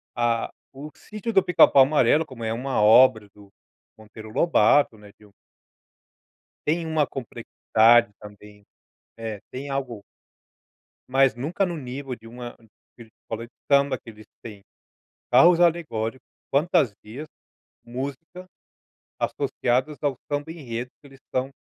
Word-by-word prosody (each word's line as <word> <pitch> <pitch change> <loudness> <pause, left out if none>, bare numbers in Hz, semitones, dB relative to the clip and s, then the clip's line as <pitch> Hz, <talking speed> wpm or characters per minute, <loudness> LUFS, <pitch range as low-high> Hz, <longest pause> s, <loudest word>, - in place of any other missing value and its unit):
a 120 -1 0 0.3
o 150 +2 -8
sítio 215 +2 -7
do 195 - +4
pica 175 -2 +6
pau 135 - +6
amarelo 145 +2 +3
como 130 -5 -10
é 110 - -2
uma 125 -1 -2
obra 110 -1 +5
do 100 -1 -18 0.5
Monteiro 110 0 -12
Lobato, 115 -2 +3
né, 105 -1 -15
de 105 - -20
um 105 - -21 1.3
tem 165 +2 0
uma 155 -3 +1
complexidade 120 -2 +2
também, 105 0 -14 0.5
eh, 110 -3 -6
tem 135 +2 -7
algo 130 -6 -4 1.1
mas 135 -1 +3
nunca 150 - -2
no 175 -2 -3
nível 135 -1 -6
de 115 -1 -15
uma 120 +1 -9
de 115 +1 -19
uma 110 - -23 0.2
escola 115 +1 -4
de 120 - -29 0.2
samba 140 0 +3
que 115 - -13
eles 110 0 -15 0.2
têm 105 -4 -10 0.7
carros 175 0 +6
alegóricos, 150 -9 0 0.3
fantasias, 140 - 0 0.6
música, 140 +9 -7 0.7
associadas 130 +5 -1
ao 145 -2 +1 0.2
samba 145 +2 -2
enredo, 125 -6 -6
que 145 - -16
eles 135 -1 -18
estão 130 0 -3
125 Hz, 135 wpm, -24 LUFS, 115-145 Hz, 1.3 s, pica